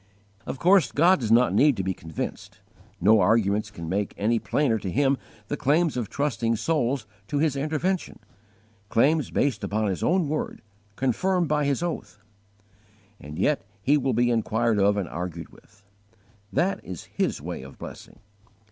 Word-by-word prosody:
Of - - -4
course 185 +4 +4
God 175 +4 +4
does 115 -4 -2
not 120 +2 +5
need 145 -3 +4
to 95 - -1
be 95 0 -1
convinced: 80 -3 -6 0.4
no 105 +4 +5
arguments 105 -1 +2
can 85 -5 -8
make 100 +4 -2
any 115 +3 +1
plainer 120 -5 +1
to 95 - -4
Him 140 +6 +2 0.3
the 145 - -2
claims 150 +3 +2
of 120 -5 -3
trusting 120 -5 0
souls 135 -2 0 0.2
to 145 - -2
His 150 -1 +1
intervention, 155 +6 -1 0.7
claims 150 +8 +2
based 130 -7 0
upon 105 0 0
His 95 - -3
own 180 -2 +2
word, 155 +2 -3 0.3
confirmed 170 - +1
by 150 -1 +1
His 140 +3 0
oath. 170 -10 -4 1.0
And 75 +1 -9
yet 140 +10 +1 0.2
He 145 - +4
will 135 -3 +1
be 120 +2 +2
inquired 115 -1 +1
of 100 +1 +3
and 100 -4 -1
argued 85 0 -6
with. 110 -2 -22 0.7
That 190 +3 0
is 90 -3 -7
His - - -2
way - - -6
of 65 +1 -12
blessing. - - -10
120 Hz, 165 wpm, -25 LUFS, 105-150 Hz, 1.0 s, not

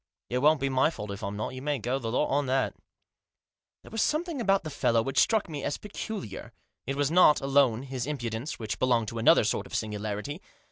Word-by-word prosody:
It 125 - +1
won't 150 +2 +4
be 135 - 0
my 130 +2 +3
fault 105 -10 -7
if 100 - -7
I'm 100 +1 -4
not; 110 - -3
you 130 - -7
may 145 +1 -1
go 125 +3 -2
the 115 -3 -4
lot 130 - +2
on 140 0 +1
that" 130 +1 +1 1.1
There - - -14
was 225 - -1
something 315 -2 0
about 195 -3 +2
the 155 - -6
fellow 115 -4 +2
which 135 - 0
struck 220 -2 +3
me 150 -4 -6
as - - -2
peculiar; 205 - -7 0.3
it 135 - -1
was 145 +1 0
not 170 -3 +6
alone 135 -3 +2
his 130 -2 -4
impudence, 120 -2 -4
which 105 -4 -4
belonged 120 -4 +2
to 115 - -5
another 115 - +6
sort - - -1
of - - -7
singularity. 105 - -3
135 Hz, 220 wpm, -28 LUFS, 115-150 Hz, 1.1 s, not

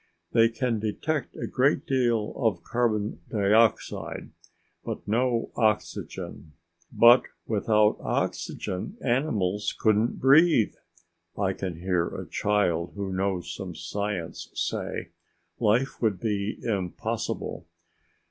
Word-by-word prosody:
They 115 -1 +5
can 115 0 -1
detect 130 +7 -2
a - - -4
great 135 +3 +1
deal 120 -5 +1
of 115 -6 0
carbon 110 -6 -1
dioxide 110 +1 +1 0.5
but - - -6
no 115 +2 +1
oxygen. 105 -7 -2 0.4
"But 120 +2 +7 0.2
without 105 0 +2
oxygen, 95 - -3
animals 110 -7 0
couldn't 110 +2 +2
breathe!" 140 -3 +5 0.6
I 95 -2 +1
can 95 -3 -4
hear 90 -2 +1
a - - -6
child 90 -5 0
who 100 -2 -3
knows 95 -1 -1
some 95 -4 -6
science 90 0 -4
say. - - -3 0.5
"Life 120 +6 +1
would 105 -6 +1
be 105 -1 -1
impossible!" 95 -6 -3
105 Hz, 105 wpm, -27 LUFS, 100-120 Hz, 0.6 s, But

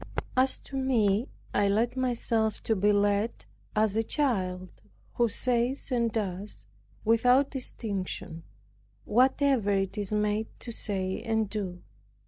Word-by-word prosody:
As 260 +1 +3
to 275 - -8
me, 235 -4 +2 0.3
I 205 0 +3
let 225 +5 +1
myself 230 -4 0
be 210 -2 +2
led 205 +2 +1 0.3
as 215 -1 +2
a 225 - +3
child, 190 -9 -1 0.4
who 240 - +2
says 250 +4 0
and 235 -2 +1
does, 195 - -4 0.4
without 250 +5 +4
distinction, 200 - -4 0.6
whatever 255 -1 +3
it 195 +1 0
is 205 -1 -3
made 210 +1 +1
to 235 - -4
say 190 -4 -2
and 220 -1 0
do. 190 -5 -4
220 Hz, 120 wpm, -28 LUFS, 200-245 Hz, 0.6 s, without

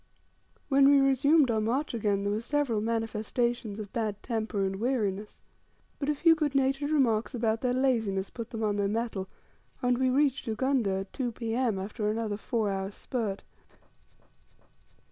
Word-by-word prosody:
When 275 0 +5
we 285 -1 +6
resumed 275 +1 +4
our 220 -1 +1
march 250 +8 -1
again 205 -3 0
there 200 0 0
were 215 - -1
several 260 -4 0
manifestations 225 0 -1
of 210 0 -7
bad 215 -4 -2
temper 220 -4 -1
and 190 0 -2
weariness. 210 -4 -2 0.6
But 280 - -2
a 300 - +2
few 330 +3 +5
good 300 -3 -1
natured 275 +2 +1
remarks 250 -5 +1
about 225 -1 0
their 250 - +1
laziness 225 -7 0
put 230 -1 -7
them 225 -2 -4
on 205 -1 0
their 200 -1 +1
mettle, 215 -3 -2 0.5
and 245 0 +1
we 260 0 +3
reached 275 0 +1
Ugunda 225 -4 0
at 195 - -10
2 245 -3 -2
P.M. 230 -1 -1
after 210 +2 -3
another 215 -1 -2
four 220 -1 -1
hours' 195 +1 -4
spurt. 220 -6 -3
230 Hz, 165 wpm, -29 LUFS, 210-265 Hz, 0.6 s, we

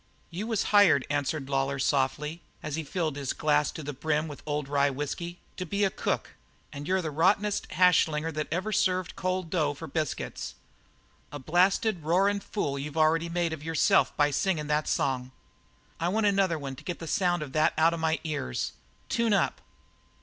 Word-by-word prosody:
"You 195 +6 -4
was 225 -3 0
hired," 195 -10 +6
answered 145 0 -1
Lawlor 135 0 0
softly, 145 +4 0 0.2
as 150 -2 -3
he 160 - -3
filled 155 -1 -2
his 140 -3 -2
glass 150 -1 +2
to 160 - -7
the 145 +1 -4
brim 150 +3 -1
with 145 -2 -8
the - - -11
old 145 -1 -1
rye 140 0 +2
whisky, 145 +5 -4 0.2
"to 185 - -2
be 200 +3 -1
a 195 - +3
cook, - - -2 0.4
and 145 +1 -7
you're 185 0 +1
the 155 - -3
rottenest 200 +7 +1
hash 180 -1 +5
slinger 155 +1 -3
that 155 -1 -3
ever 185 +6 -1
served 185 -3 +1
cold 185 -3 -2
dough 150 -5 +1
for 165 - -7
biscuits; 155 -3 -3 0.8
a 145 - -5
blasted, 180 - +2
roarin' 195 +6 +2
fool 145 -9 -3
you've 145 +2 -6
already 160 +2 +3
made 170 -1 0
out - - -4
of 145 - -14
yourself 160 -1 +2
by 145 0 +3
singin' 165 -1 0
that 150 +1 0
song. 130 -1 0 0.7
I 170 - 0
want 215 +3 +1
another 195 -4 +2
one 135 -2 -6
to - - -12
get 175 - -4
the 165 - -7
sound 175 -2 +1
of 140 - -8
that 155 +1 +2
out 165 +1 +4
of 170 - -3
my 160 0 +1
ears. 150 - -2 0.4
Tune 230 -2 +1
up!" 200 - +1
160 Hz, 195 wpm, -28 LUFS, 145-185 Hz, 0.8 s, hired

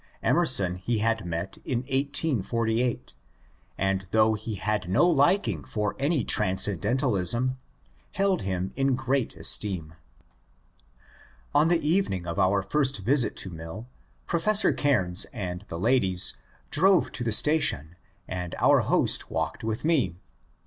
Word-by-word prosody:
^/Emerson 130 - +3
he 115 +5 -1
had 110 -2 0
met 85 +3 -4
in 120 -2 -2
1848, 125 - -1 0.6
and 95 -1 -1
though 110 +1 +3
he 110 0 -5
had 105 -2 -2
no 95 - +4
likingfor 145 - +1
any 140 -1 +1
transcendentalism, 105 - +1 0.5
held 195 -2 +1
him 95 -1 -3
in 135 -1 +1
great 130 0 -1
esteem^ 90 -7 -1 1.6
On 150 +2 +4
the 170 -3 +1
evening 155 - 0
of 85 -1 -4
our 95 +1 +2
first 135 +5 0
visit 125 +3 +1
to 95 - -5
Mill, 80 +7 -8 0.4
Professor 205 +5 +2
Caimes 95 -11 +1
and 95 -5 -5
the 85 - -6
ladies 95 -3 +1 0.4
drove 185 +2 +3
to 120 - -4
the 115 - -1
station 105 - +1 0.3
and 90 -2 -5
our - - +4
host - - +1
walked - - -3
with 110 +4 -3
me. 135 - +1
115 Hz, 125 wpm, -26 LUFS, 95-140 Hz, 1.6 s, no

